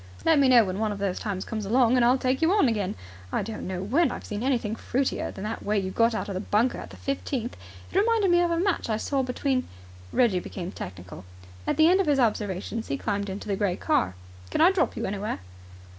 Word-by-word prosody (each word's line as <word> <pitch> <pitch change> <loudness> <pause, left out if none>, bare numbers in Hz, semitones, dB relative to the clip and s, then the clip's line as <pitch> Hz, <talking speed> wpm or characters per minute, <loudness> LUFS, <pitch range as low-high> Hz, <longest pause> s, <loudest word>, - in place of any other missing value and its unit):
"Let 320 -2 +5
me 275 - +5
know 240 -3 +7
when 185 +1 -3
one 215 -1 0
of 205 - -4
those 195 -2 -2
times 195 -4 -3
comes 220 -2 -4
along, 240 +4 +3
and 250 - +4
I'll 245 +2 +5
take 260 +2 0
you 325 +2 +4
on 410 -9 +4
again. 210 -5 -1 0.4
I - - 0
don't 220 +2 -6
know 185 0 -3
when 280 - +2
I've - - -7
seen 210 0 -4
anything 235 -4 0
fruitier 265 +3 -1
than 190 - -8
the 220 +2 -3
way 210 +1 0
you 190 -1 -1
got 230 +2 +2
out - - -3
of 200 - -4
the 185 - -2
bunker 215 +5 +1
at - - -8
the - - -12
fifteenth. 270 -3 -3 0.4
It 380 - +2
reminded 430 -3 +3
me 350 0 +5
of 350 - +2
a 335 0 0
match 370 -8 0
I 215 - +1
saw 275 +4 0
between 255 0 -1 0.2
" 90 0 -19
Reggie 220 -7 +3
became 180 0 -6
technical. 90 - -8 0.4
At - - 0
the 315 0 +6
end 370 +3 +5
of 380 - -2
his 285 -2 +3
observations 215 -1 -1
he 135 - -2
climbed 200 +2 -2
into 195 +2 -6
the 200 - 0
grey 195 -3 0
car. 95 - 0 0.3
"Can - - -2
I 340 +4 +7
drop 385 - 0
you - - -2
anywhere?" 205 +2 -3
225 Hz, 250 wpm, -26 LUFS, 200-270 Hz, 0.4 s, know